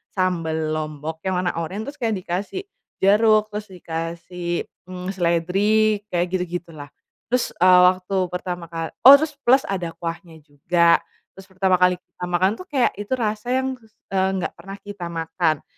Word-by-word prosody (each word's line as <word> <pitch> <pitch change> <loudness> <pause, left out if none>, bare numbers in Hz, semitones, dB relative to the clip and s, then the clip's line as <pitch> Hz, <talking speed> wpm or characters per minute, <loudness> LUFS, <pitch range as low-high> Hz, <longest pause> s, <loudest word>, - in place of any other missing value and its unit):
sambel 160 -4 0
Lombok 155 +1 -5
yang 185 -1 0
warna 180 -1 -1
orange 185 - -4
terus 295 - -24
kayak 225 -2 +1
dikasih 190 - -4 0.4
jeruk 215 +2 +4
terus 210 0 -5
dikasih, 170 0 -4 0.3
mmm, 180 0 -6
seledri 195 +5 +2
kayak 175 0 +1
gitu-gitulah, 170 -5 -5 0.4
terus, 250 0 +1
eee, 180 0 +7
waktu 185 +1 0 0.2
pertama 180 -1 -4
kal 165 0 -5 0.2
oh 275 - +13
terus 300 +1 0
plus 265 +2 +4
ada 175 -4 -3
kuahnya 170 -1 -6
juga, 170 +4 +3 0.4
terus 195 0 -13
pertama 185 -1 +1
kali 180 0 +4
kita 180 0 -9
makan 185 +2 +2
tuh 370 - -9
kayak 265 -4 +2
itu 205 +5 -3
rasa 215 -1 -2
yang 260 0 -1
kus 220 -2 -24 0.2
eee, 190 0 +2
gak - - -2
pernah 195 +3 -8
kita 205 -4 -7
makan. 165 -1 -1
180 Hz, 160 wpm, -22 LUFS, 170-205 Hz, 0.4 s, oh